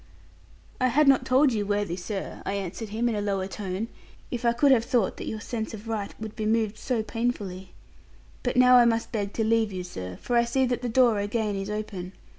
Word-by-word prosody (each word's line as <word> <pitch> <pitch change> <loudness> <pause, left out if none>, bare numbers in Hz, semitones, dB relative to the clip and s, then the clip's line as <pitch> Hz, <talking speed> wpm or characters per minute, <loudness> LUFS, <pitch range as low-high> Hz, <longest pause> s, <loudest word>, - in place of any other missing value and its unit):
'I 255 - +3
had 285 +4 +3
not 265 -1 +4
told 265 +1 +4
you, 210 -2 0
worthy 205 -3 -1
sir,' 190 +2 -5
I - - -2
answered 200 +3 -4
him, 225 +3 0
in 235 - +1
a 210 - -1
lower 195 -2 -1
tone, 195 +2 -4 0.4
'if 245 -2 -3
I 235 - +5
could 270 +4 +3
have 240 -4 +5
thought 235 -4 +1
that - - -6
your 220 - -3
sense 220 0 -4
of 215 +1 -11
right 215 -3 -3
would 220 -1 -7
be 215 -1 -2
moved 220 -1 +1
so 240 -4 -1
painfully. 205 -6 -3 0.7
But 245 0 -1
now 250 0 +7
I 240 - +7
must 230 -1 +1
beg 205 -4 -2
to 225 - 0
leave 220 -1 +2
you, 185 -1 -4
sir 90 - -7
for 245 - -2
I 235 - +5
see 260 +3 +1
that 245 -1 -1
the 245 - -2
door 235 -3 +4
again 210 0 -1
is 195 +1 -4
open. 205 -4 -5
220 Hz, 230 wpm, -26 LUFS, 200-240 Hz, 0.7 s, now